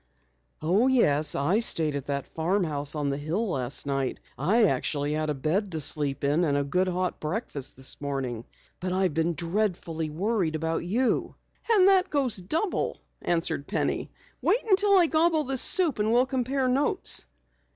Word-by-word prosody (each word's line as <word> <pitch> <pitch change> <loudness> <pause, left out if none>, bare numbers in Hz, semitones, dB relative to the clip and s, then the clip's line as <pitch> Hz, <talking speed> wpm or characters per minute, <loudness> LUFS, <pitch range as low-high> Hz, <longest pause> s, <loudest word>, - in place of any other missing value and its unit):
"Oh, 195 +10 +2
yes, 155 - +2
I 170 +10 +1
stayed 160 -10 +3
at 140 -2 -5
that 140 -1 -3
farmhouse 160 -4 0
on 145 -2 -1
the 140 - -3
hill 180 +8 -2
last 130 -1 0
night. 135 -2 -2 0.2
I 200 - +2
actually 145 -7 0
had 155 0 -2
a 150 - -1
bed 180 +9 -1
to 160 - -2
sleep 145 -1 +2
in 145 +5 +2
and 145 -4 +1
a 140 - 0
good 180 +7 0
hot 180 0 -2
breakfast 155 - -3
this 130 +1 -3
morning. 130 -5 -4 0.3
But 180 0 -3
I've 185 -3 0
been 165 +2 0
dreadfully 170 -2 -2
worried 180 0 -1
about 160 +1 -2
you." 235 +9 -1 0.4
"And 390 -4 +5
that 380 -1 +4
goes 270 -7 +1
double," 320 - -2 0.2
answered 165 -4 -1
Penny. - - -2 0.3
"Wait 475 - +2
until 400 0 +4
I 355 - +5
gobble 320 0 +2
this 265 -2 +1
soup, 340 - +4
and 215 +1 +1
we'll 245 +2 +4
compare 260 0 -1
notes." 270 +3 +1
175 Hz, 170 wpm, -26 LUFS, 145-240 Hz, 0.4 s, And